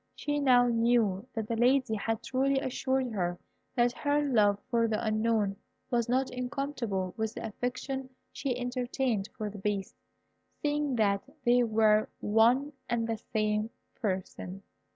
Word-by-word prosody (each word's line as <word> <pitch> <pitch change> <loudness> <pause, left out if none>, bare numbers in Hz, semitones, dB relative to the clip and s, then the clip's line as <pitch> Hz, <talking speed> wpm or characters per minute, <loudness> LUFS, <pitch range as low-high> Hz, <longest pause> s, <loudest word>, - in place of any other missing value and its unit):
She 290 0 -1
now 250 -3 +5
knew 230 -3 +2
that 220 -2 -2
the 230 - -1
Lady 250 0 +3
had 225 +2 -2
truly 270 +2 +1
assured 260 -1 -1
her 175 -4 -1 0.4
that 240 -1 +3
her 290 +3 +1
love 210 -7 +4
for 230 -1 +3
the 215 -1 0
Unknown 215 -2 +1 0.3
was 235 -1 +1
not 260 +2 +1
incompatible 250 -7 -3
with 220 0 -2
the - - -5
affection 255 +4 -4 0.2
she 260 -3 -2
entertained 245 -3 -1
for 210 -1 -3
the 205 - -9
Beast, 200 -1 -2 0.7
seeing 295 -2 0
that 200 -3 +2 0.2
they 245 +1 +5
were 215 -2 +3
one 240 +7 +3 0.2
and 235 -1 +1
the 225 -1 -2
same 215 0 +1 0.2
person. 190 -2 -4
235 Hz, 145 wpm, -30 LUFS, 215-255 Hz, 0.7 s, now